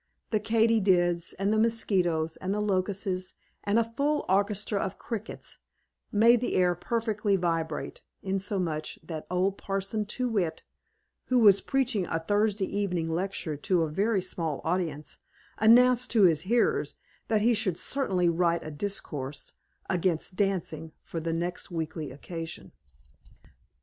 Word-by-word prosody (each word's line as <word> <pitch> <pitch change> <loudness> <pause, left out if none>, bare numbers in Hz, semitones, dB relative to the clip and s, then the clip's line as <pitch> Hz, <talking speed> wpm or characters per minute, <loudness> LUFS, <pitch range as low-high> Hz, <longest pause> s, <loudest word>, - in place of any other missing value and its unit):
The 215 - +2
Katy 225 +1 +3
dids, 175 -3 +2
and 200 +3 0
the 215 - +2
Mosquitoes, 180 -8 +1
and 190 +2 -2
the - - -1
Locusts, 190 -2 -1 0.3
and 205 +2 +1
a 230 - +5
full 280 +7 -1
orchestra 200 +2 +1
of 190 - -3
Crickets 225 -2 -6 0.5
made 230 +3 +5
the 250 - -1
air 180 -1 +4
perfectly 215 +1 0
vibrate, 165 -4 -2 0.2
insomuch 185 -5 -2
that 155 -1 -7
old 185 +2 0
Parson 195 +2 -2
Too 250 +4 -1
whit, 195 -9 -1 0.6
who 255 - +2
was 205 -4 +7
preaching 250 -9 0
a 165 - -1
Thursday 205 +3 +1
evening 180 -5 -1
lecture 175 -2 -2
to 170 +3 +1
a 155 - -2
very 200 +3 +1
small 165 -5 -3
audience, 160 -4 -2 0.4
announced 245 +3 +6
to 220 -4 +5
his 165 -5 +5
hearers 420 - +2 0.3
that 215 -2 +2
he 235 +2 +4
should 200 -6 0
certainly 190 -11 0
write 170 0 +1
a 155 - -5
discourse 145 -5 -4 0.3
against 180 -1 0
dancing, 170 -5 -1
for 165 - -5
the 165 +1 -2
next 175 +3 -3
weekly 160 -3 -4
occasion. 160 - -7
190 Hz, 140 wpm, -28 LUFS, 165-215 Hz, 0.6 s, was